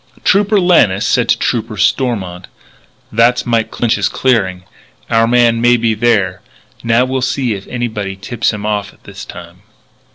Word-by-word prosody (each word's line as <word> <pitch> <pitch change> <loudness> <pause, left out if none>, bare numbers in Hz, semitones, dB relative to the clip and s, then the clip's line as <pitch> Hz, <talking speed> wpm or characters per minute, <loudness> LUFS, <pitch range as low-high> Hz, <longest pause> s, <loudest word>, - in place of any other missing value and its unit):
Trooper 205 +1 +3
Lannis 120 - +3
said 125 -2 +1
to - - +3
Trooper 115 -2 -2
Stormont: 100 -4 -1 0.6
"That's 115 +3 +2
Mike 115 -2 0
Clinch's 110 -4 0
clearing. 95 -8 0 0.5
Our 115 0 +3
man 120 -1 +3
may 120 0 +4
be 115 -1 0
there. 105 -5 0 0.4
Now 115 +2 +2
we'll 130 0 -2
see 125 -2 -1
if 100 -1 -8
anybody 110 -5 -4
tips 115 +4 -2
him 105 -1 -6
off 105 -1 -3
this - - -10
time." - - -12
115 Hz, 150 wpm, -15 LUFS, 105-120 Hz, 0.6 s, may